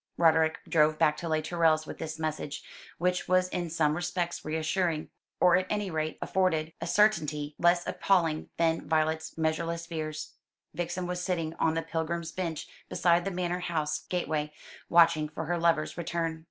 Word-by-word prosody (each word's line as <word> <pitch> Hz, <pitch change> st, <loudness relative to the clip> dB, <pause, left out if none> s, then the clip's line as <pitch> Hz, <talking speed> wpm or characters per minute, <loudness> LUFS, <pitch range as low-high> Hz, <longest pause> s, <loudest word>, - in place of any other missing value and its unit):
Roderick 160 Hz, -1 st, +3 dB
drove 155 Hz, -1 st, +3 dB
back 150 Hz, 0 st, +3 dB
to 170 Hz, -, -4 dB
Les 155 Hz, -1 st, +1 dB
Tourelles 160 Hz, -1 st, +2 dB
with -, -, -8 dB
this 160 Hz, 0 st, -5 dB
message, 155 Hz, -2 st, -4 dB, 0.3 s
which 180 Hz, +1 st, 0 dB
was 185 Hz, 0 st, +3 dB
in 175 Hz, -2 st, -3 dB
some 155 Hz, -2 st, +1 dB
respects 175 Hz, 0 st, -2 dB
reassuring, 160 Hz, +1 st, -1 dB, 0.3 s
or 180 Hz, -1 st, +6 dB
at 185 Hz, 0 st, -1 dB
any 205 Hz, -3 st, -1 dB
rate 155 Hz, -1 st, -2 dB
afforded 165 Hz, -4 st, 0 dB
a 165 Hz, -, -3 dB
certainty 155 Hz, -8 st, +2 dB
less 175 Hz, 0 st, +3 dB
appalling 165 Hz, -5 st, +1 dB
than 165 Hz, -1 st, +1 dB
Violet's 160 Hz, 0 st, 0 dB
measureless 165 Hz, +1 st, -1 dB
fears. 155 Hz, -2 st, -5 dB, 0.4 s
Vixen 175 Hz, +1 st, -3 dB
was 180 Hz, 0 st, -3 dB
sitting 165 Hz, -4 st, -1 dB
on 160 Hz, 0 st, +2 dB
the 165 Hz, -, -1 dB
pilgrim's 165 Hz, +1 st, -3 dB
bench 170 Hz, -4 st, -4 dB, 0.2 s
beside 175 Hz, 0 st, +2 dB
the -, -, 0 dB
manor 180 Hz, -1 st, -2 dB
house 160 Hz, -4 st, -1 dB
gateway, 155 Hz, -4 st, -1 dB, 0.4 s
watching 165 Hz, -3 st, +5 dB
for 160 Hz, +1 st, -5 dB
her 175 Hz, +2 st, -1 dB
lover's 165 Hz, -2 st, +2 dB
return. 165 Hz, -1 st, -2 dB
165 Hz, 165 wpm, -29 LUFS, 155-175 Hz, 0.4 s, or